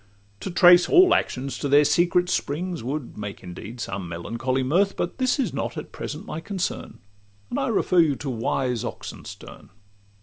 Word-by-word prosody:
To -, -, -5 dB
trace 175 Hz, 0 st, +6 dB
all 365 Hz, 0 st, +7 dB
actions 130 Hz, +1 st, -1 dB
to 145 Hz, -, -2 dB
their 145 Hz, +2 st, +6 dB
secret 175 Hz, +4 st, +3 dB
springs 175 Hz, -2 st, -2 dB
Would 135 Hz, -2 st, -5 dB
make 100 Hz, -2 st, -7 dB
indeed 95 Hz, +7 st, -9 dB
some 95 Hz, -5 st, -5 dB
melancholy 120 Hz, +10 st, -2 dB
mirth; 185 Hz, +9 st, +1 dB
But 175 Hz, +8 st, -3 dB
this 255 Hz, -1 st, +2 dB
is 270 Hz, -, -1 dB
not -, -, -3 dB
at -, -, -7 dB
present -, -, -6 dB
my 155 Hz, -, -5 dB
concern, 185 Hz, +2 st, -4 dB, 0.5 s
And 270 Hz, -, -1 dB
I 270 Hz, -, 0 dB
refer 195 Hz, -5 st, +2 dB
you 155 Hz, -4 st, +4 dB
to 140 Hz, +1 st, -5 dB
wise 125 Hz, +1 st, -1 dB
Oxenstiern. -, -, -9 dB
150 Hz, 170 wpm, -24 LUFS, 125-180 Hz, 0.5 s, all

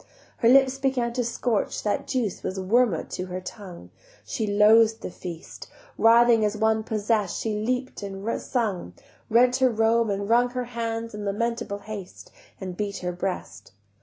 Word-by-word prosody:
Her 230 Hz, -, +3 dB
lips 270 Hz, +1 st, +5 dB
began 255 Hz, -3 st, 0 dB
to 250 Hz, 0 st, 0 dB
scorch, 235 Hz, -1 st, -1 dB
That 205 Hz, -, -1 dB
juice 235 Hz, -8 st, -2 dB
was 190 Hz, -, -4 dB
wormwood 205 Hz, -2 st, +1 dB
to 185 Hz, -, -4 dB
her 180 Hz, 0 st, -4 dB
tongue, 180 Hz, -, -10 dB, 0.3 s
She 215 Hz, -, -3 dB
loath'd 220 Hz, +2 st, +5 dB
the -, -, -5 dB
feast: 175 Hz, -1 st, -9 dB, 0.3 s
Writhing 230 Hz, 0 st, +5 dB
as 210 Hz, 0 st, 0 dB
one 220 Hz, 0 st, +2 dB
possess'd 215 Hz, -3 st, 0 dB
she 215 Hz, -1 st, -2 dB
leap'd 255 Hz, +3 st, -2 dB
and 200 Hz, +2 st, -4 dB
sung, 200 Hz, -, -2 dB, 0.3 s
Rent 250 Hz, +3 st, +4 dB
all 260 Hz, -, +6 dB
her 245 Hz, -, -1 dB
robe, 225 Hz, +1 st, +3 dB
and 200 Hz, 0 st, -2 dB
wrung 240 Hz, +2 st, +4 dB
Her 250 Hz, 0 st, -3 dB
hands 230 Hz, -1 st, -4 dB
in 210 Hz, 0 st, -6 dB
lamentable 205 Hz, 0 st, -2 dB
haste, 205 Hz, -4 st, -8 dB, 0.3 s
And 185 Hz, -2 st, -6 dB
beat 200 Hz, 0 st, -3 dB
her 180 Hz, -, 0 dB
breast. 180 Hz, -, -5 dB
220 Hz, 165 wpm, -25 LUFS, 200-235 Hz, 0.3 s, all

